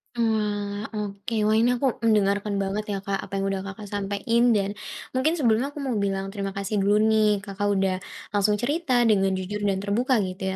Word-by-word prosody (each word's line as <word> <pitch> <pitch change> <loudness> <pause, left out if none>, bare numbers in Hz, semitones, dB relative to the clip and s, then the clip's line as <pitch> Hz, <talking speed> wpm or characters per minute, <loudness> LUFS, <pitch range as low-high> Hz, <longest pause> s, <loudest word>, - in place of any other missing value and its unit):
Oalah, 210 -2 -1
oke. 205 +2 -4
Wah, 215 +1 +3
ini 240 +2 +4
aku 255 0 0
mendengarkan 205 -1 +2
banget, 200 +2 -2
ya, 200 - -1
Kak, 195 -1 -2
apa - - -11
yang 195 0 -1
udah 195 - -2
Kakak 195 +2 -8
sampein 205 +4 0
dan 200 0 0 0.4
mungkin 290 +6 +1
sebelumnya 245 -3 +2
aku 290 - -5
mau 265 - -2
bilang 195 -1 -1
terima 195 -1 -4
kasih 200 +1 -1
dulu, 200 +1 +3
nih, 215 -2 +3
Kakak 205 0 -3
udah 190 -1 +1 0.4
langsung 205 0 +2
cerita 255 +1 +1
dengan 195 -4 +3
jujur 190 +3 -4
dan 195 - +2
terbuka 245 +6 +1
gitu, 190 +1 -3
205 Hz, 190 wpm, -25 LUFS, 195-225 Hz, 0.4 s, ini